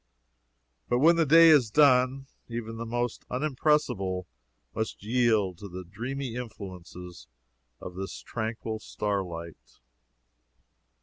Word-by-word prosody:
But 120 - +2
when 165 +6 +6
the 165 -2 +2
day 165 +3 +8
is 140 -8 +5
done, 135 0 +4 0.2
even 115 -1 -5
the 115 0 -5
most 120 0 -2
unimpressible 130 - 0 0.5
must 110 -2 -4
yield 110 -6 +1
to 100 - -8
the 90 +1 -7
dreamy 120 +7 -5
influences 90 -7 -9 0.5
of - - -8
this 95 +1 -6
tranquil 110 -1 -4
starlight. 90 -7 -5
115 Hz, 110 wpm, -28 LUFS, 95-130 Hz, 0.5 s, day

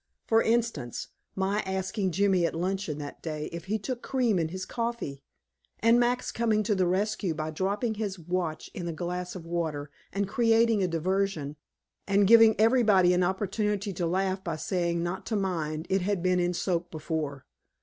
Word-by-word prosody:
For 225 0 +4
instance, 225 - -1 0.3
my 195 +2 0
asking 190 +1 -1
Jimmy 195 -1 +3
at - - -5
luncheon 185 -2 -2
that 145 -1 -7
day 155 -2 -4
if 170 0 -7
he 210 +3 0
took 240 +4 -4
cream 240 -8 +1
in 165 - +1
his 185 +3 -5
coffee! 230 - -3 0.6
And 230 +2 +5
Max 245 +1 +1
coming 220 -2 +1
to 210 +1 +1
the 185 -2 +2
rescue 195 -1 0
by 155 0 -3
dropping 200 +7 -1
his 205 -3 -3
watch 175 -1 -3
in 175 -2 -5
his 165 - -3
glass 180 +2 -4
of 175 -3 -8
water, 160 -4 -3 0.2
and 200 +1 -1
creating 225 0 +3
a 185 - +2
diversion 170 -3 -1 0.5
and 200 0 +4
giving 225 +1 +7
everybody 215 -6 +5
an 180 - +2
opportunity 200 +2 -1
to 175 -1 -1
laugh 190 +2 0
by 170 -4 -2
saying 170 +1 -1
not 175 +2 -3
to 225 - -1
mind, 165 -5 -2
it 190 0 +1
had 190 -1 -1
been 185 0 +3
in 175 0 0
soak 175 0 -1
before. 155 -4 -4
190 Hz, 180 wpm, -28 LUFS, 170-210 Hz, 0.6 s, giving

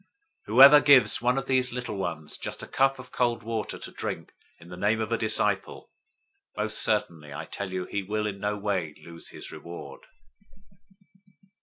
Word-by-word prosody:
010:042 195 - -35 0.4
Whoever 135 +7 +9
gives 130 -8 +5
one 125 +2 +2
of 135 - -2
these 130 -1 +1
little 125 -3 -5
ones 85 -5 -5
just - - -5
a - - -7
cup 135 0 +2
of 130 0 -12
cold 120 -2 0
water 110 -1 -4
to - - -9
drink - - -5 0.3
in 85 0 -15
the 90 - -8
name 100 +5 +1
of 110 +1 -3
a 115 - +2
disciple, 105 -3 0 0.7
most 105 0 -1
certainly 85 -9 -1
I 70 +2 -6
tell 100 +2 -6
you 90 -1 -3
he 100 - -3
will 105 +2 -2
in 100 -2 -4
no 105 +1 -2
way 95 -7 -2
lose 85 0 -9
his - - -9
reward." 85 0 -9
105 Hz, 180 wpm, -27 LUFS, 95-120 Hz, 0.7 s, Whoever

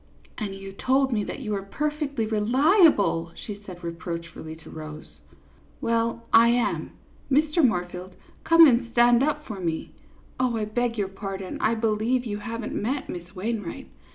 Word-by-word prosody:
" - - -29
And 200 -2 -4
you 195 0 -8
told 265 +6 +1
me 210 -2 +1
that - - -6
you 215 -5 -4
were 200 -1 -1
perfectly 290 +3 -2
reli 260 - +5
able! 170 - +1
" - - -26
she 205 -1 -7
said, 180 -2 -9
reproachfully, 170 -2 -6
to 160 - -14
Rose. 155 -1 -8 0.7
"Well, 230 0 0
I 230 +1 +8
am. 240 +1 0 0.4
Mr. 300 +4 +3
Moorfield, 180 -4 -1 0.3
come 330 0 +8
and 240 -4 +3
stand 240 0 +5
up 300 +1 0
for 205 -3 -6
me. 165 -3 -3 0.5
Oh, 250 -3 +1
I 215 - -1
beg 235 +2 -1
your 200 -2 0
pardon, 195 -1 -6
I 225 +1 +2
believe 225 +3 0
you 205 -2 -3
have 225 +2 -5
n't - - -5
met 260 +7 -2
Miss 175 +2 -8
Wainwright. 220 +5 -4
220 Hz, 175 wpm, -25 LUFS, 190-250 Hz, 0.7 s, I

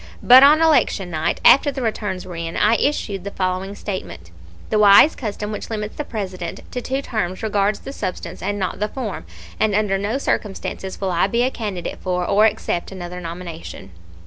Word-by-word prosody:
But 255 +1 +9
on 300 +3 +7
election 215 - +2
night, 155 -1 -1
after 285 +1 +7
the 270 -2 -5
returns 205 -4 -3
were 180 -2 -8
in 165 0 -4
I 210 +2 +4
issued 205 -10 -1
the 200 - -4
following 190 +1 -3
statement: 185 - -7 0.4
"The 215 - +2
wise 205 +9 +7
custom 210 -3 -5
which 210 - -6
limits 215 -1 -4
the 295 - -3
President 185 - -5
to 250 - -4
two 265 +3 -3
terms 185 -5 -3
regards 205 -1 0
the 275 - -8
substance 185 -8 -5
and 205 +2 -2
not 190 -2 -3
the 210 - 0
form, 215 - -6 0.3
and 215 -2 +2
under 205 -2 +1
no 210 +6 -1
circumstances 195 -6 -3
will 190 -2 -1
I 175 +2 +2
be 235 +4 +1
a 255 - +1
candidate 205 -8 -5
for 180 -1 -1
or 210 +4 +4
accept 175 -4 -3
another 180 -1 -7
nomination." 165 - -8
200 Hz, 190 wpm, -21 LUFS, 185-220 Hz, 0.4 s, But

